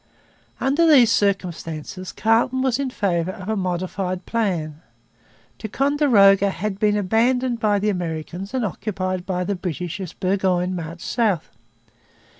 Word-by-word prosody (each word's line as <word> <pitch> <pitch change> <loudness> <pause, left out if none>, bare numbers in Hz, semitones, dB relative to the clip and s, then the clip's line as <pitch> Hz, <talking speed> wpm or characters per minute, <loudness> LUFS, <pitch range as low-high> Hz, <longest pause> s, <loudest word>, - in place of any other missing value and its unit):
Under 290 +5 +2
these 255 -8 +6
circumstances 185 -3 -2
Carleton 235 +4 +1
was 260 -1 +1
in 275 -2 -1
favour 180 -7 -1
of 190 0 -9
a 220 - +1
modified 185 0 -3
plan. 170 -9 -2 0.8
Ticonderoga 220 -6 +4
had 195 +1 -4
been 210 -1 +2
abandoned 235 +5 +1
by 210 -2 +2
the 210 +1 0
Americans 175 +1 -4
and 250 -3 0
occupied 185 -1 -3
by 180 -1 -1
the 200 - -1
British 180 -1 -4
as 185 - -6
Burgoyne 185 -1 0
marched 170 0 -7
south. 215 -8 0
195 Hz, 130 wpm, -22 LUFS, 180-225 Hz, 0.8 s, these